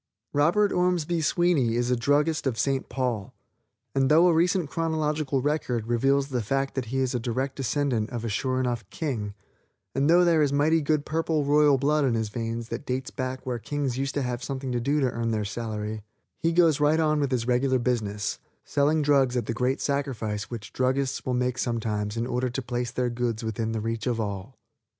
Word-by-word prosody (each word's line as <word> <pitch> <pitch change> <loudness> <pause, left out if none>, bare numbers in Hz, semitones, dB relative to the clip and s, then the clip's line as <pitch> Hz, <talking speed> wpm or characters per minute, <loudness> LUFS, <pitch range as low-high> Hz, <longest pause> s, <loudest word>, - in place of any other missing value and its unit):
Robert 175 +8 +3
Ormsby 175 -2 +1
Sweeney 150 -6 +2
is 120 +1 0
a - - +4
druggist 145 +5 +1
of 120 -4 -1
St. 135 +1 0
Paul; 120 -7 -2 0.6
and 135 -1 +2
though 160 +3 +6
a 175 - +5
recent 175 +1 +2
chronological 155 -4 -1
record 135 -6 -1
reveals 135 +4 +2
the 125 -3 -1
fact 135 +5 -1
that 130 -2 -2
he 125 +4 -3
is 130 -1 0
a 125 - 0
direct 130 +4 -2
descendant 135 -4 0
of 120 -2 -4
a - - -1
sure 130 +4 -1
enough 120 -3 -1
king, 110 -11 -3 0.6
and 140 +3 +1
though 175 +1 +6
there 165 -2 +4
is 145 -2 +2
mighty 155 +3 +3
good 150 0 0
purple, 160 -2 0
royal 145 -1 +5
blood 150 +3 +2
in 125 -4 +2
his 110 -1 -1
veins 115 +1 -4
that 115 - -4
dates 130 +1 -3
back 130 -1 -4
where 125 -2 -2
kings 140 -1 -2
used 135 0 -2
to 140 - 0
have 125 0 -3
something 135 -1 -4
to 120 - 0
do 140 +5 +1
to 130 -2 +2
earn 115 0 -2
their 110 -2 -1
salary, 110 0 -4 0.4
he 165 - +1
goes 165 -4 +4
right 150 +2 +3
on 155 -1 +2
with 140 -2 +1
his 125 -3 0
regular 130 +2 +2
business, 110 -5 -1 0.3
selling 150 +2 +2
drugs 135 -3 +3
at 120 - -1
the - - -2
great 125 +4 0
sacrifice 120 -7 -2
which 110 -4 -7
druggists 130 +1 0
will 125 - +1
make 125 +1 0
sometimes 110 -3 -2
in 115 - 0
order 125 +1 -1
to 125 +2 -4
place 120 0 -2
their 125 0 -1
goods 120 -2 -2
within 110 0 -2
the 110 - -2
reach 115 0 -3
of 120 -2 0
all. 100 +3 -4
130 Hz, 205 wpm, -26 LUFS, 115-145 Hz, 0.6 s, though